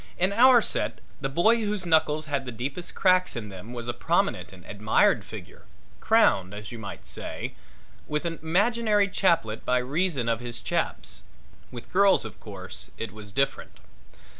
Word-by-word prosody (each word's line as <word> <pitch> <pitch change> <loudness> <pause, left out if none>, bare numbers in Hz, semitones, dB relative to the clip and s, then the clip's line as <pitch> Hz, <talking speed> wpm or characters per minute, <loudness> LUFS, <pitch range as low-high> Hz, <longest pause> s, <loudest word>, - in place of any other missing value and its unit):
In 185 +3 +2
our 245 +1 +7
set - - 0 0.2
the 135 - -1
boy 195 +11 +4
whose 210 -4 -2
knuckles 155 -2 +2
had 140 -3 -2
the 125 - -5
deepest 135 +10 -5
cracks 185 -3 +3
in 110 -3 -5
them 95 +4 -10
was 120 -1 -6
a 120 - -1
prominent - - 0
and 90 -2 -14
admired 105 +1 +2
figure, - - -11 0.3
crowned, 95 +1 +3
as 105 0 -8
you 120 - -7
might 100 -2 -8
say, - - -6 0.5
with 150 +2 -2
an 165 -2 -3
imaginary 205 +5 +2
chaplet 165 - +1
by 125 - +2
reason 140 0 0
of 115 -1 +1
his 120 -1 -5
chaps. - - -2 0.4
With 120 -2 -10
girls, 195 - +5
of 110 - -9
course, 95 -3 -7
it 115 - -5
was 105 -1 -9
different. 135 +7 -1
140 Hz, 165 wpm, -26 LUFS, 115-185 Hz, 0.5 s, our